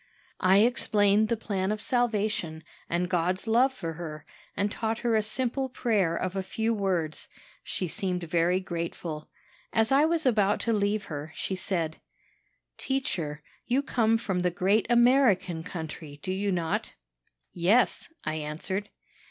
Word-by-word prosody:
"I 190 +1 +5
explained 215 -3 +3
the 235 - +1
plan 195 -3 -1
of 215 - -2
salvation, 215 - 0 0.3
and 175 +1 0
God's 180 +2 0
love 240 +4 +4
for 170 -10 -5
her, 155 -2 -7 0.3
and 205 +1 +1
taught 225 0 -1
her 230 -2 +3
a 215 - +4
simple 255 +5 -1
prayer 210 -9 +1
of 185 +1 -3
a 195 - 0
few 220 +4 -1
words. 185 -7 -1 0.3
She 185 - -2
seemed 180 +1 -2
very 170 +2 +2
grateful. 170 -3 -5 0.4
As 225 +1 +2
I 280 +3 +5
was 325 -1 0
about 210 -5 +3
to 230 - +1
leave 205 0 0
her, 150 0 -6
she 190 - -2
said: 170 -4 -2 0.8
"'Teacher, 175 - -2 0.2
you 260 +3 +2
come 225 -4 +2
from 195 -5 -2
the 180 0 +2
great 190 +4 +2
American 235 -8 +4
country, 160 -3 -7
do 185 - -2
you 200 +1 -1
not?' 170 -3 -2 0.6
"'Yes,' 200 - +2
I 155 0 -2
answered. 160 +7 -3
195 Hz, 150 wpm, -28 LUFS, 170-225 Hz, 0.8 s, I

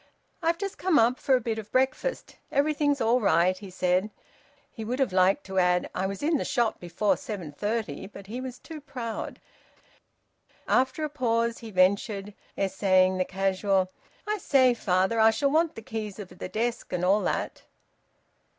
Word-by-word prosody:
"I've 335 0 +1
just 395 +1 -5
come 370 -4 +3
up 235 +3 +3
for 265 - +3
a - - +2
bit 225 -2 -3
of 210 -1 -10
breakfast. 265 - -1
Everything's 290 0 +1
all 235 +2 +3
right," 185 -2 +3
he 195 +1 -10
said. 185 +2 +1 0.6
He 225 - -7
would 240 +4 -2
have 265 -8 0
liked 190 +8 +3
to 190 0 -1
add: 180 0 +2
"I 190 - -1
was 195 +6 -6
in 315 +1 +2
the - - -2
shop 240 -6 0
before 185 +4 0
seven 185 -9 -6
thirty," 210 +8 -3
but 200 -1 -12
he 235 +6 -6
was 255 -1 -6
too 315 +1 -10
proud. 240 -5 -6 1.3
After 260 +4 +2
a - - +1
pause, 235 -5 0
he 225 - -9
ventured, 200 +1 +1 0.2
essaying 185 -1 +2
the 185 - +2
casual 190 0 0 0.4
"I 425 0 -1
say, 260 -7 +4
father, 190 0 +1
I 220 0 +7
shall 275 +5 +1
want 320 +1 +2
the 225 - -8
keys 220 -4 -5
of 200 -4 -8
the 180 0 -8
desk, 235 +3 -2
and 180 0 -1
all 200 +3 +4
that." - - -2
220 Hz, 180 wpm, -27 LUFS, 190-260 Hz, 1.3 s, I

